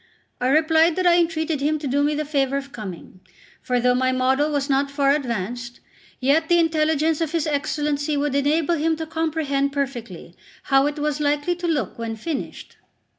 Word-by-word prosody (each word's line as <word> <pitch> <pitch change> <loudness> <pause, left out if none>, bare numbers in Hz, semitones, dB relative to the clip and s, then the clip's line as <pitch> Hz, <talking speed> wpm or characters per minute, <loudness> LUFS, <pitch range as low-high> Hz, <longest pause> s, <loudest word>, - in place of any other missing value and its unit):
I 250 - 0
replied 320 +3 +3
that 370 - -1
I 350 -1 +5
entreated 320 -3 -1
him 305 +2 +1
to 300 - -7
do 280 +2 +1
me 295 +1 +1
the 305 +1 -2
favour 275 -2 0
of 275 0 -6
coming; 190 -5 -9 0.4
for 250 -1 0
though 250 +1 +3
my 255 +1 +1
model 260 +3 +1
was 285 -1 -1
not 275 0 +1
far 280 -1 +2
advanced, 240 -3 -3 0.4
yet 295 +5 +2
the 345 - +5
intelligence 315 -1 +1
of 325 -1 -2
his 330 -3 0
Excellency 295 0 -1
would 285 -1 -1
enable 290 +4 +1
him 320 +2 +1
to 320 0 -5
comprehend 310 -3 -1
perfectly 240 - -5 0.3
how 270 +1 +3
it 295 +1 -3
was 300 0 -1
likely 295 +4 0
to 350 0 -4
look 265 - -2
when 230 -1 -3
finished. 285 +6 -6
290 Hz, 185 wpm, -22 LUFS, 270-315 Hz, 0.4 s, I